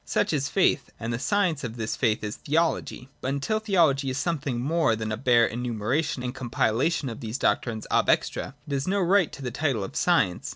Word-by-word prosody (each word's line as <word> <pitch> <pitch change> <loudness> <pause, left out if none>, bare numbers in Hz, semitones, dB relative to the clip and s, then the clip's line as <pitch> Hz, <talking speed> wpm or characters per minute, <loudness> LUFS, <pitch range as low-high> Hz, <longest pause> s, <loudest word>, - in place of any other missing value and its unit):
Such - - 0
is 145 -1 0
faith: 150 -9 +2
and 115 +1 -3
the 115 - -2
science 175 -2 +1
of 120 -1 -5
this 110 -1 -2
faith 110 -4 0
is 105 0 -3
Theology. 155 -4 -1
But - - -3
until 140 +11 0
Theology 165 -11 +2
is 130 - -3
something 145 -6 -1
more 150 -2 +2
than 110 0 -4
a - - 0
bare 120 -1 +4
enumera 120 +4 -1
tion 130 -4 -4
and 125 0 -3
compilation 130 +4 0
of 115 - -6
these 110 +2 -4
doctrines 110 -6 0
ab - - +2
extra, 135 - 0
it 145 - -4
has 135 +2 -1
no 200 +2 +1
right 185 -2 +3
to 140 - -9
the 125 - -3
title 135 -5 -1
of 95 - -7
science. 125 - +1
135 Hz, 215 wpm, -26 LUFS, 115-160 Hz, -, bare